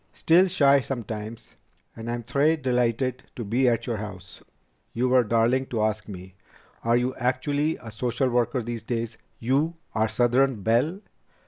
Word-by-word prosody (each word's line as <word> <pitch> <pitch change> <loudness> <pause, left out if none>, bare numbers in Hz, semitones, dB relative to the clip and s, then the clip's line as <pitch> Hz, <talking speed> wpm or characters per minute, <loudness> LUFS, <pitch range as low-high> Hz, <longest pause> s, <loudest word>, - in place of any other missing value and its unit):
"Still 175 +4 +4
shy 140 -6 +4
sometimes, 115 -4 -6 0.4
and 115 +1 -7
I'm 120 0 -3
très 145 +6 +2
delighted 125 0 0
to 120 - -4
be 125 +5 +2
at 115 -1 0
your 115 -3 -2
house. 100 -3 -9 0.5
You 125 +2 0
were 125 -1 +5
darling 115 +4 +2
to 110 -3 -1
ask 110 -1 -1
me. 95 -2 -9 0.5
Are 115 +1 +3
you 125 +1 0
actually 145 +5 0
a 115 - -9
social 125 +4 -1
worker 120 +1 +1
these 115 0 -4
days? 115 0 -4 0.2
You, 140 +8 0 0.2
our 110 0 +1
southern 120 0 +2
belle?" 130 - +1
120 Hz, 155 wpm, -25 LUFS, 115-130 Hz, 0.5 s, were